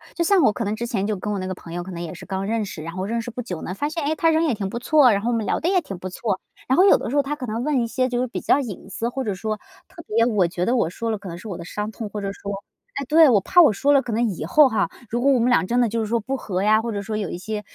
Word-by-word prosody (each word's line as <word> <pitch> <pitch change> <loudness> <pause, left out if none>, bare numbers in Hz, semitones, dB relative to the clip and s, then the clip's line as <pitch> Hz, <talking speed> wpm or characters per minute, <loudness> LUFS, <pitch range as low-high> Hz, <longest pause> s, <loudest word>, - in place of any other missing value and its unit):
就 340 - 0
像 385 +2 +4
我 240 - +5
可 230 - -4
能 210 0 -1
之 235 +2 -4
前 200 -4 -1
就 215 0 -1
跟 210 +3 -4
我 - - -2
那 185 - -4
个 185 - -3
朋 170 -2 -11
友 175 0 -3
可 190 - -8
能 170 -1 -6
也 170 -2 -5
是 175 - -10
刚 190 +1 -3
认 225 0 0
识， 170 - -7
然 165 +2 -6
后 185 +1 -3
认 230 +3 -1
识 230 - -6
不 245 +1 -5
久 180 -9 -6
呢， 180 - -4
发 290 +8 -2
现， 325 0 -4
哎， 310 +2 0
他 330 +1 +3
人 320 +1 +2
也 300 - +1
挺 200 -2 -3
不 235 - -4
错， 265 0 +5
然 200 -1 +1
后 230 - -1
我 240 - +1
们 225 -2 -1
聊 - - 0
得 335 - 0
也 375 -1 +3
挺 195 - -8
不 185 - -5
错， 195 +1 -2 0.3
然 260 - +3
后 370 - +6
有 400 - +7
的 - - -5
时 270 - -3
候 285 - +5
他 280 +2 -3
可 280 -4 -6
能 230 +1 -3
问 285 -3 +1
一 - - 0
些 255 +2 0
就 245 -1 -1
是 255 - 0
比 235 - -5
较 - - +3
隐 205 -6 -7
私， 225 +4 -2
或 265 +2 -3
者 210 -5 -2
说 215 +3 -3 0.3
特 375 -3 -12
别 230 +2 +3
我 210 -7 +2
觉 175 +1 -2
得 245 - +2
我 195 -10 +1
说 230 +6 -3
了 215 - -1
可 200 - -10
能 170 - -7
是 205 - -10
我 180 - -5
的 - - -8
伤 210 +4 -4
痛， 220 -1 -6
或 210 0 -5
者 195 0 -3
说 200 0 -6 0.4
哎， 280 - -2
对， 315 -1 +7
我 210 -5 +4
怕 355 - +5
我 295 -10 +6
说 280 +8 +2
了， 280 -1 +5
可 240 - -5
能 235 +2 +2
以 175 -6 -4
后 290 - +5
哈 220 - 0 0.2
如 240 +1 -1
果 275 - +3
我 - - +3
们 240 +1 +2
俩 245 - +4
真 240 +6 +1
的 240 - +2
就 230 +2 -2
是 220 - 0
说 235 +2 +1
不 265 +5 -3
和 190 -6 -3
呀， 215 +1 +4
或 230 0 -3
者 200 - -2
说 215 +1 -4
有 205 -4 -3
一 - - -5
些， 210 +3 -4
225 Hz, 395 characters per minute, -23 LUFS, 195-255 Hz, 0.4 s, 有